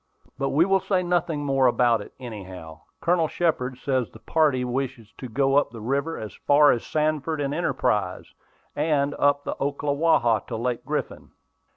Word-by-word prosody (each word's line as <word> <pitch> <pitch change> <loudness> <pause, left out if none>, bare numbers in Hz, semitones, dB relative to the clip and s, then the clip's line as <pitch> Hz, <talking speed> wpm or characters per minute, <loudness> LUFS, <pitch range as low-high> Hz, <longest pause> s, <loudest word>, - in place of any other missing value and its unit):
But 135 0 -1
we 160 +5 +3
will 195 0 +3
say 185 -1 0
nothing 170 -4 0
more 135 -2 +3
about 120 -2 +3
it, - - -11
anyhow. 95 -9 -9 0.2
Colonel 170 -2 +2
Shepard 135 -7 -1
says 130 -3 -1
the - - -14
party 145 -6 +1
wish 125 0 -2 0.2
to 130 - -7
go 135 +3 +2
up 145 - +3
the 115 0 -10
river 140 +8 -2
as 110 - -7
far 145 0 +4
as 120 - -1
Sanford 155 0 -1
and 140 -1 -1
Enterprise, 105 - -1 0.4
and 145 -2 +1
up 145 0 +3
the - - -3
Ocklawaha 140 -4 +2
to 115 - -4
Lake 120 +1 -2
Griffin." - - -4
140 Hz, 170 wpm, -25 LUFS, 120-155 Hz, 0.4 s, far